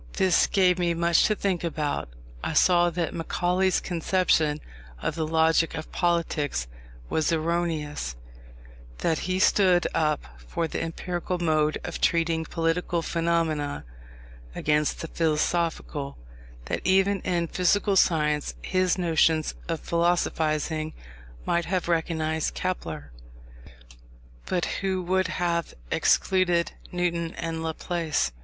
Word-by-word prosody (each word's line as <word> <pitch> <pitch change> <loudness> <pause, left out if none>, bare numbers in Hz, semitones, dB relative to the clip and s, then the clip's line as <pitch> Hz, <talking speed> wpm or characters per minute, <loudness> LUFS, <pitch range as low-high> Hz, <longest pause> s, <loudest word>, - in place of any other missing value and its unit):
This 185 -2 +3
gave 185 -2 +3
me 170 -1 +1
much 170 0 +3
to 215 - +2
think 190 -4 -1
about. 150 - -2 0.3
I - - -2
saw 175 -1 +5
that 170 -1 -2
Macaulay's 180 +2 +1
conception 165 -3 +1 0.4
of - - -2
the 160 -1 -2
logic 160 +1 +2
of 155 0 -6
politics 165 - 0 0.4
was 155 - 0
erroneous; 160 - -1 0.9
that 165 -2 +2
he 185 - +1
stood 185 -2 +4
up 150 -2 +1
for 60 - -3
the - - -4
empirical 175 +2 -3
mode 155 -3 +1
of - - -5
treating 165 -1 +2
political 165 +1 -1
phenomena, 165 - -1 0.7
against 150 0 +1
the 165 - -4
philosophical; 160 -2 -1 0.5
that - - -2
even 195 +1 +3
in 175 -2 0
physical 195 +4 +2
science 150 -5 +2
his 185 0 +1
notions 160 -2 +2
of 165 -2 -2
philosophizing 160 -2 0 0.5
might 170 0 +1
have 180 -1 -1
recognised 160 -2 0
Kepler, 80 - -4 1.4
but 180 -2 -1
would 190 -1 0
have 170 -2 -1 0.2
excluded 175 -3 +2 0.2
Newton 170 -2 -1
and 165 -1 -4
Laplace. 160 - -1
170 Hz, 115 wpm, -26 LUFS, 155-180 Hz, 1.4 s, saw